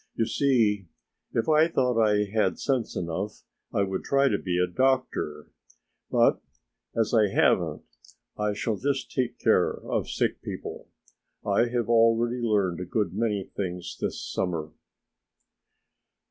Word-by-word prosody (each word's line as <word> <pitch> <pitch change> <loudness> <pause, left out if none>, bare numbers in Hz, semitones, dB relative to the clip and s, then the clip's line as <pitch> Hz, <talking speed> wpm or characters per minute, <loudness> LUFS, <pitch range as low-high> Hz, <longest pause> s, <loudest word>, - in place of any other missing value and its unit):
"You 115 - +1
see 110 -6 +2 0.4
if 115 - -1
I 155 +1 +5
thought 125 -7 +1
I 105 -1 +3
had 100 -3 0
sense 130 -5 -1
enough 90 +5 -4 0.3
I 100 - +1
would 95 -1 -3
try 140 0 +3
to 100 - 0
be 90 -2 -2
a 90 - +3
doctor, 90 - -1 0.6
but - - +3 0.5
as 115 0 +1
I 110 -3 +5
haven't - - +2 0.5
I 105 0 -1
shall 105 +1 -2
just 135 +3 -2
take 125 -2 -1
care - - +3
of - - -3
sick - - -1
people. - - -7 0.6
I 105 +3 +3
have 120 -1 -1
already 115 +1 +3
learned 100 -6 +1
a 90 - -4
good 105 +3 -1
many 105 -2 -1
things 90 -2 -4
this - - -2
summer." 80 -4 -3
110 Hz, 140 wpm, -27 LUFS, 95-120 Hz, 0.6 s, I